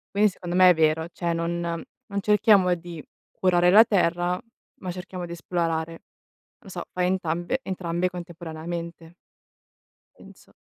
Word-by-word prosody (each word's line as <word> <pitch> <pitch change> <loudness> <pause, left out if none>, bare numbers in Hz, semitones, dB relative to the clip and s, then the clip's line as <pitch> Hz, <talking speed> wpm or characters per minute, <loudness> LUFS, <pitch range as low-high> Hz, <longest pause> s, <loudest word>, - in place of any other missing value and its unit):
Quindi 210 +1 +5
secondo 175 -2 -6
me 185 0 +8
è - - +7
vero, 160 0 +1
cioè 170 -1 -2
non 170 +1 -2 0.5
non 200 - -1
cerchiamo 205 -3 +4
di 170 -2 -9 0.3
curare 180 -1 +3
la 215 +5 +8
terra, 175 -4 +1 0.4
ma 185 - -4
cerchiamo 180 0 -7
di 170 - -10
esplorare. 165 -1 -2 0.6
Lo - - -15
so, 175 -2 -6
fai 180 0 +1
entambe 175 +5 -1
entrambe 180 -2 -2
contemporaneamente. 170 -1 -7 1.0
Penso. - - -17
175 Hz, 135 wpm, -25 LUFS, 170-185 Hz, 1.0 s, me